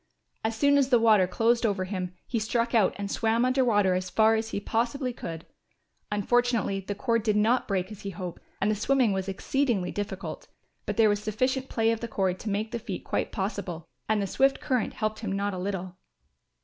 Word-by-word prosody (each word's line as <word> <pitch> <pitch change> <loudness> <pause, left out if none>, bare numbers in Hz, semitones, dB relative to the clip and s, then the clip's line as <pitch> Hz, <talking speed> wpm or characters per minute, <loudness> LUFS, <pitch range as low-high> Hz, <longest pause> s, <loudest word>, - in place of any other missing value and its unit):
As 220 0 -1
soon 285 +3 +4
as 270 -1 +2
the 245 - +6
water 215 -5 +5
closed 230 +5 +2
over 200 -4 +1
him 185 -1 -4
he 235 - -1
struck 230 +2 0
out 220 -5 +3
and 200 0 -4
swam 230 +2 +2
under 255 +1 +3
water 205 -6 +3
as 185 0 -2
far 220 +2 +4
as 225 0 -1
he 200 - -2
possibly 240 +5 -1
could. 165 -6 -7 0.7
Unfortunately 225 -1 +1
the 200 +1 -5
cord 230 +1 +1
did 215 -1 +1
not 225 +4 +2
break 190 -1 -1
as 210 -1 -9
he 200 - -4
hoped 180 -2 -6 0.2
and 205 +2 +2
the - - +1
swimming 245 0 +2
was 190 0 -2
exceedingly 210 -1 0
difficult, 195 -5 -5 0.4
but - - -2
there 225 -1 +6
was 205 0 +1
sufficient 255 +5 -1
play 225 -1 +2
of 230 - -2
cord 190 -3 0
to 220 - -4
make 210 +2 -2
the 235 - -3
feat - - -6
quite - - -2
possible, 190 -5 -4 0.2
and 215 - +3
the 200 - 0
swift 270 +8 +2
current 255 -3 -1
helped 215 0 -2
him 215 -4 -4
not 200 +1 -1
a 185 - -4
little. 185 -1 -4
215 Hz, 210 wpm, -27 LUFS, 195-235 Hz, 0.7 s, the